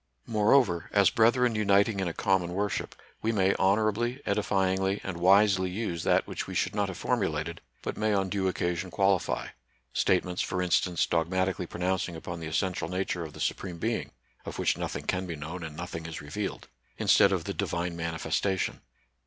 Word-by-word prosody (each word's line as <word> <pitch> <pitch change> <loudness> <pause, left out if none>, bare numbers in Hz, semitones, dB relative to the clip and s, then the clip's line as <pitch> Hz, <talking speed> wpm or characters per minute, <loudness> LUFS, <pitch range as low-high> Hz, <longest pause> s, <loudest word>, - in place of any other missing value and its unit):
Moreover, 105 -5 +3
as 100 -3 +5
brethren 120 +2 +4
uniting 100 0 +3
in 95 - 0
a - - -1
common 90 -2 +1
worship, 100 +1 -2 0.3
we 110 - +1
may 95 -3 +3
honorably, 110 +6 +2
edifyingly, 95 -1 +1
and 95 -3 -4
wisely 95 +1 +4
use 90 -3 -3
that - - +2
which - - -5
we - - -6
should - - 0
not 100 -1 0
have 95 -2 -6
for 125 - +1
mulated, 85 -6 -2 0.2
but - - -4
may 110 0 +1
on 95 -2 +1
due 95 0 -1
occasion 90 0 -1
qualify, 95 0 +1 0.3
— - - -41
statements, 90 -1 +1
for 90 - -2
instance, 90 -1 +2
dogmatically 90 +2 0
pronounc 90 +2 -1
ing 85 - -8
upon 85 +1 -6
the 80 - -5
essential 90 +2 -1
nature 90 -1 -2
of 80 -2 -8
the - - -11
Supreme 90 -3 -2
Being 110 +6 -2 0.3
(of - - -7
which - - +2
nothing - - -4
can 95 0 -1
be 85 - -4
known 80 +5 -6
and 80 -1 -7
nothing 80 -2 -5
is 80 - -6
revealed), 100 +8 -5 0.3
instead - - +5
of - - 0
the - - -4
Divine 85 0 -2
manifestation. 85 +3 -1
95 Hz, 185 wpm, -28 LUFS, 85-100 Hz, 0.3 s, as